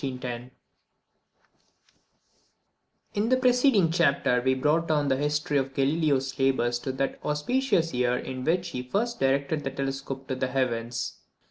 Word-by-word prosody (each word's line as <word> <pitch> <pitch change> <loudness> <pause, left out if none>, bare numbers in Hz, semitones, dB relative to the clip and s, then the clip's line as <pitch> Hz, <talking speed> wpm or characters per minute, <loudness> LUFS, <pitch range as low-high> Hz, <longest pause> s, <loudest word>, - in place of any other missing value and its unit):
_ 125 -2 -4 2.6
In 210 +3 0
the 255 - +4
preceding 250 - +3
chapter 140 -7 +2
we 130 0 +3
have 130 - -5
brought 160 +3 +2
down 150 -2 +1
the 130 - +3
history 150 +1 0
of 135 0 -4
Galileo's 140 -2 +1
labours 125 -3 +2
to 130 - -3
that 135 +1 -2
auspicious 165 - 0
year 125 0 +1
in 130 0 -5
which 175 +4 0
he 125 -6 -4
first 215 - -2
directed 140 +3 +1
the 135 - -2
telescope 135 0 -4
to - - -2
the 130 0 -1
heavens. 125 -2 -2
135 Hz, 145 wpm, -27 LUFS, 130-165 Hz, 2.6 s, the